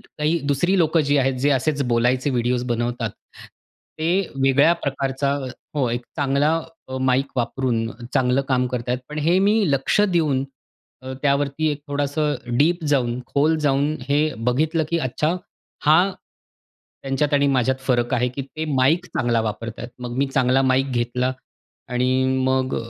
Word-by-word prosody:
काही 155 +3 -2
दुसरी 175 +7 +2
लोकं 165 -1 +3
जी 145 - +3
आहेत, 135 -1 +2
जे 140 +3 +2
असेच 145 +2 +1
बोलायचे 125 +3 +1
व्हिडिओस 125 0 0
बनवतात, 120 -1 -2 0.9
ते 170 +5 +2 0.2
वेगळ्या 140 +5 +5
प्रकारचा 140 -3 -1 0.4
हो, 135 -4 +1
एक 120 +1 -2
चांगला 145 +1 +2 0.3
अ, 130 - -5
माईक 130 +1 +2
वापरून 120 -2 -1 0.3
चांगलं 125 +1 +2
काम 125 -1 +2
करत 125 -1 -4
आहेत. 125 0 0
पण 150 - -6
हे 165 +5 +3
मी 200 +2 +3 0.2
लक्ष 140 +8 +2
देऊन, 160 -9 +2 0.6
अ, 130 0 -6
त्यावरती 145 +2 +1
एक 145 - -4
थोडंसं 145 +1 0 0.2
डीप 165 +2 +2
जाऊन, 125 -4 +1
खोल 155 +3 +2
जाऊन 145 +1 +1
हे 145 - +3 0.3
बघितलं, 155 +5 +1
की 170 0 0
अच्छा 150 +6 -1 0.5
हां, 170 +6 +5 0.9
त्यांच्यात 135 +2 -1
आणि 140 0 +3
माझ्यात 130 +1 +2
फरक 120 -2 +1
आहे, 125 +1 +1
की 130 +3 -5
ते 155 +4 -6
माईक 155 +8 +2
चांगला 120 -8 0
वापरतायत. 115 +2 -5
मग 125 -1 -6
मी 140 - +2
चांगला 130 0 +2
माईक 130 +1 +2
घेतला 125 +1 -1 0.6
आणि 130 +1 +1 0.2
मग 130 0 +1
135 Hz, 150 wpm, -22 LUFS, 125-150 Hz, 0.9 s, वेगळ्या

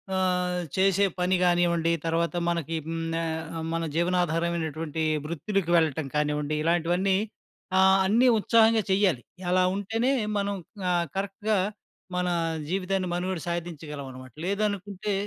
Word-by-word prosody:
ఆహ్, 180 -1 +1
చేసే 195 +1 +3
పని 180 +1 +2
కానివ్వండి. 175 -2 +3
తర్వాత 165 +1 0
మనకి 165 -2 -1
హ్మ్, 165 0 -3 0.2
ఆహ్, 160 0 -4 0.2
మన 165 - 0
జీవనాధారమైనటువంటి 165 -2 0 0.2
వృత్తులకు 170 +3 -2
వెళ్ళటం 160 -3 +2
కానివ్వండి. 150 0 0
ఇలాంటివన్నీ 175 +3 +2 0.6
ఆహ్, 190 0 +6
అన్నీ 230 +6 +4
ఉత్సాహంగా 225 +1 +4
చెయ్యాలి. 190 -9 +3 0.3
ఎలా 185 +1 +4
ఉంటేనే 225 +6 0 0.3
మనం 200 0 -1 0.4
ఆహ్, 175 -1 +2
కరెక్ట్‌గా 200 +2 -1 0.6
మన 180 0 0 0.4
జీవితాన్ని 190 0 -1
మనుగడ 180 0 -2
సాధించగలం 160 -4 -5
అన్నమాట. 130 -1 -11
లేదనుకుంటే 200 0 -2
175 Hz, 115 wpm, -27 LUFS, 165-195 Hz, 0.6 s, ఆహ్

